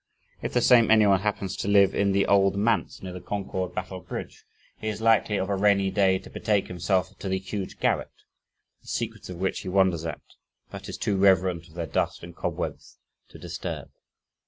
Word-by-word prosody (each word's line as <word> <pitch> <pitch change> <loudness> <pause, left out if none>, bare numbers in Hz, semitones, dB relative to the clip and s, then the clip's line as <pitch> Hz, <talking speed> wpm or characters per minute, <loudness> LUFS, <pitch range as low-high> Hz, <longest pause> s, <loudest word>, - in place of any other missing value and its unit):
If - - -4
the 125 - +3
same 120 -3 +6
anyone 105 -3 +5
happens 100 -2 -2
to - - -3
live 100 -1 +5
in 100 0 +2
the 100 0 +2
"Old 100 0 +3
Manse" 105 0 0
near 90 -1 -6
the 90 - -7
Concord 95 -3 -4
Battle 90 +1 -4
Bridge, - - -8 0.3
he 110 - -5
is 105 -1 -3
likely 110 -2 +3
"of 95 - -1
a 100 - 0
rainy 100 -1 +3
day 95 -2 +3
to - - -12
betake 105 -3 0
himself 90 +1 -1
to 95 - -4
the 95 - +1
huge 95 +1 -6
garret," - - +1 0.7
the - - -23
secrets 110 -4 -4
of 90 - -6
which 95 +2 -1
he 95 - -6
wonders 90 -3 +2
at, 80 -2 -5 0.5
"but - - -8
is - - -5
too 100 - 0
reverent 95 -3 +3
of 80 - -19
their 85 -1 -3
dust 75 - -2
and - - -10
cobwebs - - -5 0.3
to - - -13
disturb." - - -6
95 Hz, 200 wpm, -26 LUFS, 95-105 Hz, 0.7 s, same